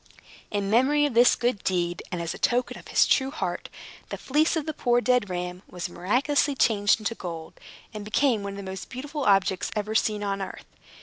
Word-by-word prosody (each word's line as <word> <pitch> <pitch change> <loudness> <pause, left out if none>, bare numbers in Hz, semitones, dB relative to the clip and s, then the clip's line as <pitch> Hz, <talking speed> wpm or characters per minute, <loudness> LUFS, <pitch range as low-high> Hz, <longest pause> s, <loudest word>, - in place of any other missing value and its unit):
In 200 -1 -2
memory 280 +6 +4
of 290 - -1
this 240 +2 +6
good 240 -4 -1
deed, 175 -2 -1
and 180 - -3
as 170 - -3
a - - -10
token 245 +1 +1
of - - -15
his - - +4
true 265 -1 +2
heart, 305 - -4 0.4
the - - -4
fleece 305 +5 +1
of 315 -3 -1
the 315 - -3
poor 245 -3 +2
dead 245 -4 +2
ram 180 0 -4
was 180 -1 -5
miraculously 270 +11 +1
changed 215 -3 +2
to 230 - 0
gold, 165 -6 -7 0.4
and 210 -1 -6
became 220 +2 +1
one 200 0 -5
of - - -8
the 200 - -6
most 190 0 -7
beautiful 285 +2 -5
objects 195 -2 +2
ever 210 0 -2
seen 215 -1 +1
on 200 -1 -2
earth. 190 - -7
215 Hz, 205 wpm, -26 LUFS, 190-255 Hz, 0.4 s, this